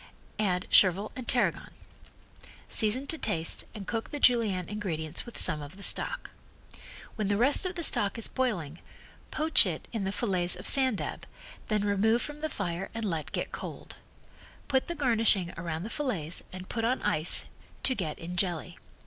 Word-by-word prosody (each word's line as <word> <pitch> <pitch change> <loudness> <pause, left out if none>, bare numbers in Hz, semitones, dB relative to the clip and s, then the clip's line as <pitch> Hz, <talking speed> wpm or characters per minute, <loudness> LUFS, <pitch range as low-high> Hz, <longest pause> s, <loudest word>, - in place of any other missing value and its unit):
Add 185 -4 0
chervil 195 +2 +5
and 255 -3 -7
tarragon. - - 0 1.0
Season 225 +5 +1
to 320 +2 0
taste 165 -7 -1
and 205 -2 -7
cook 225 +3 -3
the 290 - -5
Julienne 220 -9 +3
ingredients 170 -5 -3
with 240 - -9
some 150 - +4
of 145 +6 -10
the 200 - -10
stock. - - +1 0.9
When 210 -2 -1
the 205 0 +1
rest 275 - +5
of 370 - -6
the 340 - -3
stock 205 -7 +4
is 230 - -1
boiling 175 - -2 0.5
poach 310 -8 +5
it 165 -4 -5
in 220 -3 -2
the 190 - -1
fillets 185 -5 0
of - - -10
sand 260 -5 +4
dab, - - -6 0.4
then 210 -2 0
remove 215 +4 +2
from 295 0 -7
the 315 - -2
fire 180 - -4
and 225 -1 -3
let 165 -6 -3
get - - -3
cold. - - -8 0.7
Put 265 -2 +1
the 345 - -4
garnishing 225 - +2
around 165 -1 -4
the 220 - -6
fillets 195 - -2
and 185 0 -9
put 225 - -3
on 250 +3 0
ice 155 +3 +2 0.4
to 260 - +3
get 170 -10 -4
in 175 +2 -7
jelly. 175 -2 -1
205 Hz, 175 wpm, -29 LUFS, 175-245 Hz, 1.0 s, chervil